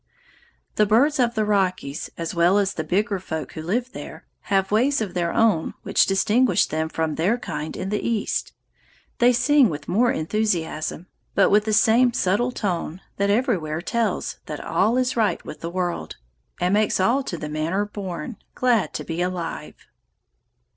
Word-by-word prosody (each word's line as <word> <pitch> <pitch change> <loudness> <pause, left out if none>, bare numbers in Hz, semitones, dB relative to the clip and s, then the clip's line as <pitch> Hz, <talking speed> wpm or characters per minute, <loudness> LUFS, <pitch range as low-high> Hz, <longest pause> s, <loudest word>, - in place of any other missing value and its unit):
The 210 - +4
birds 275 +8 +3
of 235 -2 +2
the 215 -1 +1
Rockies, 185 -7 -1
as 165 +1 -4
well 175 +3 +3
as 200 -1 +1
the 160 - -3
bigger 200 +5 0
folk 160 -4 -5
who 160 - -7
live 235 +10 -2
there, - - -9 0.2
have 195 -1 +1
ways 260 +7 +3
of 205 -5 -3
their 170 -2 0
own 210 -8 +2
which - - +3
distinguish 205 +1 +3
them 160 +1 -2
from 160 -1 -2
their 185 +10 +1
kind 150 -9 -5
in 190 - -4
the 210 0 -1
East. 230 -3 -1 0.7
They 245 +1 +6
sing 255 +1 +4
with 145 -2 -6
more 235 +6 +3
enthusiasm, 165 -3 -2 0.3
but 195 - +4
with 210 +1 +4
the 220 - 0
same 235 +3 +4
subtle 210 +7 +1
tone 180 -5 -3 0.2
that 200 0 +1
everywhere 200 - 0
tells 230 +6 -2
that - - -5
all 235 +3 +2
is 255 0 0
right 225 -3 0
with - - -8
the 165 - -4
world, 175 - -3 0.4
and 180 +2 +1
makes 210 -1 +2
all 235 +9 +3
to 185 -10 -5
the 155 - -5
manner 160 +7 -1
born 195 -1 -6 0.2
glad 245 -5 +1
to - - -3
be 165 +1 -4
alive. 180 -2 -4
195 Hz, 175 wpm, -23 LUFS, 170-230 Hz, 0.7 s, They